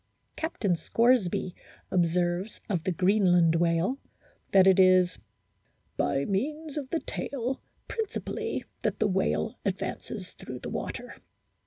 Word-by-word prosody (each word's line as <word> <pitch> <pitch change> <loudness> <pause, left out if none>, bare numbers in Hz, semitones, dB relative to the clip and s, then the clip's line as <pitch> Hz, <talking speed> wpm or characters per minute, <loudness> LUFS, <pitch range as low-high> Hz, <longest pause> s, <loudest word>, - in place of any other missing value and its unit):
Captain 220 - 0
Scoresby 220 -3 +2 0.4
observes 175 +2 +1
of 180 -6 0
the 185 - +1
Greenland 180 -2 +4
whale 170 +9 +1 0.5
that 190 -1 +7
it 190 0 +6
is 185 -1 +5 0.8
"by 135 +1 +1
means 295 +9 -2
of 285 -4 -4
the 330 - -1
tail 260 -1 -3 0.3
principally 445 -2 -3 0.2
that - - 0
the 220 - +1
whale 195 +3 0
advances 190 0 -4
through 130 - -8
the - - -6
water. - - -5
190 Hz, 120 wpm, -28 LUFS, 175-235 Hz, 0.8 s, that